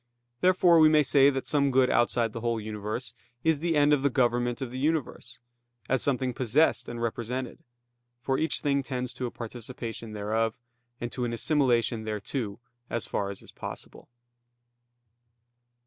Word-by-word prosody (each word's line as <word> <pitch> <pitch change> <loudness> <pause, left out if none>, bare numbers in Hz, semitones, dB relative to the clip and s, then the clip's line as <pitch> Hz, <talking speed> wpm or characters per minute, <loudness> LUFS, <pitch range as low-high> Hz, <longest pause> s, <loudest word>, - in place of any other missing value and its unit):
Therefore 180 -2 +5
we 155 -1 +7
may 155 -1 +5
say 140 0 +5
that 135 -2 -2
some 140 -2 +2
good 130 -1 +3
outside 120 -2 +2
the 115 - -5
whole 115 -1 0
universe 110 +2 -4 0.3
is 160 -2 +2
the 165 +1 0
end 145 0 +5
of 145 - +2
the 140 - +3
government 120 -2 +1
of 130 -3 -5
the 130 - -5
universe, 140 -5 -2 0.5
as 135 -1 +1
something 130 -2 0
possessed 130 +6 +2
and 120 0 -6
represented; 120 +2 -3 0.6
for 130 +2 -1
each 160 - +1
thing 140 -1 +1
tends 125 -2 -4
to 125 - -3
a - - -4
participation 115 -1 -7
thereof, 110 +2 -1 0.4
and 120 0 -4
to 125 - -3
an 120 -1 -2
assimilation 120 -4 +1
thereto, 105 0 -4 0.3
as 115 -4 -1
far 100 - -2
as 100 - -8
is - - -14
possible. - - -9
125 Hz, 165 wpm, -28 LUFS, 115-140 Hz, 0.6 s, we